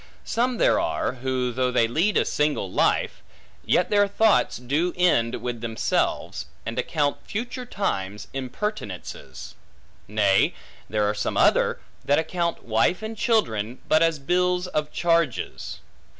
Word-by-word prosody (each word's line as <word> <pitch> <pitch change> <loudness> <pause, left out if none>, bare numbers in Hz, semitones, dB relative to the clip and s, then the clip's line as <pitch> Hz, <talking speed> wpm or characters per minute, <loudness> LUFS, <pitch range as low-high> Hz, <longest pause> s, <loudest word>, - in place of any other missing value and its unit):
Some 245 +1 0
there - - +4
are, - - -1
who 130 0 -2
though 125 +1 0
they 120 -2 +3
lead 170 - +1
a - - +3
single 150 -10 0
life, - - +1 0.4
yet 180 - +2
their 205 -1 +4
thoughts 215 +1 +3
do 145 +8 -1
end 120 -10 +2
with 120 -2 -3
themselves, 115 -2 -1 0.2
and 115 +2 -3
account 145 +2 0
future 245 +4 -4
times 105 - -3
impertinences. 130 - -5 0.5
Nay, 100 -2 +3 0.3
there 105 0 +1
are 105 - +1
some 105 - -2
other, - - +3 0.2
that 145 - +3
account 170 +1 -1
wife 115 - +1
and 220 +1 -4
children, 125 - 0
but 155 - +4
as 165 -1 +3
bills 180 +5 +1
of 150 -4 -2
charges. 170 -6 -1
145 Hz, 135 wpm, -24 LUFS, 115-180 Hz, 0.5 s, there